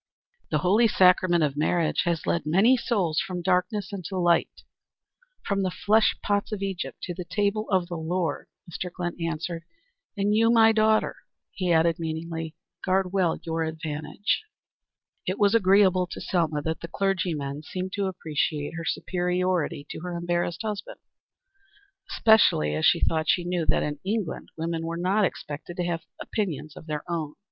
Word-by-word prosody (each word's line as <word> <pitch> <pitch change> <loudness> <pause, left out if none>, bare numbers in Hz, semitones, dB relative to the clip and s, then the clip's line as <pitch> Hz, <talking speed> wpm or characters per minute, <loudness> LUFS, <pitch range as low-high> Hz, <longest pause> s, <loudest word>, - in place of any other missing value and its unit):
"The - - +1
holy 215 +6 +5
sacrament 180 -4 +4
of 145 -2 0
marriage 160 +3 +1
has 170 -2 -1
led 170 - 0
many 195 +11 +5
souls 195 -10 0
from 180 -2 -3
darkness 185 +3 0
into 190 0 -5
light, 175 -1 +1 0.8
from 200 -1 0
the 190 - +1
flesh 215 +4 +2
pots 205 +1 0
of 205 -2 -3
Egypt 195 -2 -4
to 175 - -3
the 180 - -6
table 205 +3 -1
of 185 -3 +2
the 175 -1 -5
Lord" 165 -1 -2 0.2
Mr. 180 +1 -5
Glynn 175 -1 -4
answered. 165 +1 -3 0.5
"And 200 +1 +1
you, 225 +1 +4
my 225 -1 +6
daughter," 220 0 +2 0.3
he 185 -2 -1
added, 165 0 +3
meaningly, 165 0 -4 0.3
"guard 190 0 +1
well 185 -4 +2
your 165 0 -1
advantage." 160 - -2 0.8
It 185 - -1
was 205 0 +3
agreeable 190 -3 +4
to - - -7
Selma 160 -5 0
that 160 0 -2
the 170 - -5
clergymen 165 -7 -1
seemed 185 +4 -5
to 200 -1 0
appreciate 155 -4 -2
her 165 0 -5
superiority 180 -5 -1
to - - -6
her 175 +1 -5
embarrassed 175 +2 -1
husband, 210 -2 -5 1.1
especially 220 - +4
as 80 +1 +2
she - - +3
thought 160 -1 +1
she 180 - +3
knew 175 -2 -1
that - - +2
in 150 -1 -3
England 200 -2 -3
women 165 0 -2
were 165 +1 -3
not 190 +4 +2
expected 150 0 -6
to 180 - -1
have 170 -1 -3
opinions 165 -8 -3
of 160 - -12
their 150 -1 -3
own. 160 -4 -3
175 Hz, 165 wpm, -26 LUFS, 160-195 Hz, 1.1 s, my